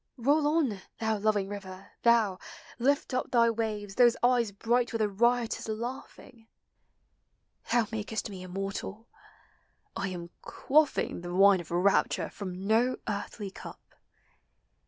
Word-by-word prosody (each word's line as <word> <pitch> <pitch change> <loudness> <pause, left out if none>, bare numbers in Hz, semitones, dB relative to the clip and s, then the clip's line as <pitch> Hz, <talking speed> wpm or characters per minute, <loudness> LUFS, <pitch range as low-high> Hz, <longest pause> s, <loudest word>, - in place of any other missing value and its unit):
Roll 290 +5 +2
on, 290 -11 +1 0.2
thou 220 -2 -1
loving 205 -2 +1
river, 195 -1 -9
thou! 225 -5 +3 0.4
Lift 275 +2 +1
up. 255 - -1
Thy 235 -1 +4
waves, 210 -3 -3
those 240 +1 +5
eyes 240 -3 +3
bright 235 +4 0
with 225 -2 -2
a - - +2
riotous 235 +4 +1
laugh 235 +4 -5
ing! 225 -3 -17 1.2
Thou 235 -1 +3
makest 220 0 -3
me 195 -3 -8
immortal! 195 +4 -5 0.9
I 195 - -2
am 175 -2 -6
quaffing 295 - +1
The 175 0 -5
wine 195 0 +6
of 165 - -13
rapture 180 +3 +1
from 185 -1 -6
no 235 +4 +2
earthly 205 -1 -4
cup - - -12
220 Hz, 135 wpm, -29 LUFS, 195-240 Hz, 1.2 s, wine